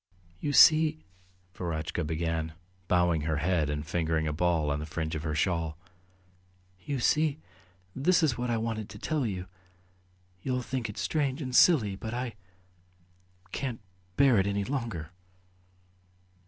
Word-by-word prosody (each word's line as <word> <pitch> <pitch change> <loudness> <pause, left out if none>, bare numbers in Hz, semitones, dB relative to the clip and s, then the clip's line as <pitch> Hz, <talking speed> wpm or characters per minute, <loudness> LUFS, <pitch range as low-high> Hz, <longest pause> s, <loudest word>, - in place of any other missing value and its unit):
"You 145 - -2
see.. 155 +1 +6 0.3
." 90 0 -36
Verotchka 80 -1 -3
began, 80 0 -2 0.3
bowing 90 -3 +2
her 80 +1 -1
head 80 -1 +1
and 75 0 -3
fingering 80 -1 0
a 75 - -1
ball 80 -2 +1
on 70 - -1
the 75 - -5
fringe 80 0 -3
of 80 - -3
her 80 -1 -2
shawl. 80 -3 0 1.1
"You 140 -2 -2
see... 150 +4 +2 0.6
this 175 +6 +3
is 140 -6 +3
what 125 0 -3
I 115 - +1
wanted 110 -2 -3
to 105 - -9
tell 145 +3 -1
you.... 95 -3 -4 1.0
You'll 125 +3 -1
think 125 -3 -3
it 105 - -8
strange... 145 -3 0
and 130 -4 -4
silly, 115 - +5
but 110 +4 -5
I... 125 -1 -3 1.2
can't 130 -4 -3 0.4
bear 130 -6 +5
it 95 - +1
any 100 0 0
longer." 115 - -4
100 Hz, 150 wpm, -29 LUFS, 80-130 Hz, 1.2 s, see